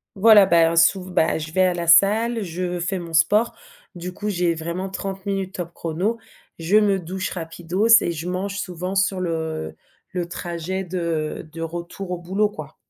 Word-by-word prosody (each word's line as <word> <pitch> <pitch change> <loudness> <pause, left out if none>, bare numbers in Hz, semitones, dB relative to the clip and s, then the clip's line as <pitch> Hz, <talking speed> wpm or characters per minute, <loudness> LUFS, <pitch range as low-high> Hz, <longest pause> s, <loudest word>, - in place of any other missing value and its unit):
Voilà, 205 0 +7
bah, 170 -2 +4
hein, 165 - -2
souv 180 +3 +3
bah, 160 - +2
je 160 +1 -6
vais 185 - +2
à 185 -1 +3
la 170 -1 -4
salle, 215 +6 +4
je 180 0 -3
fais 180 +2 -2
mon 170 -1 -8
sport. 205 +8 +3 0.4
Du 180 +1 -6
coup, 205 +3 -6
j'ai 175 -3 0
vraiment 170 +4 -4
30 195 0 -4
top 175 -1 -5
chrono. 180 +8 -2 0.4
Je 165 +5 0
me 200 -2 +3
douche 185 +2 -4
rapidos 175 +4 -2
et 170 - -1
je 165 +2 -5
mange 195 +2 -3
souvent 180 0 -4
sur 195 -1 +1
le 160 - -3 0.4
le 175 -2 -2
trajet 175 +2 -4
de 170 -4 -3
de 165 - -7
retour 175 +3 -6
au 180 - -2
boulot, 195 +4 0
quoi. 155 -5 -10
180 Hz, 180 wpm, -22 LUFS, 165-195 Hz, 0.4 s, Voilà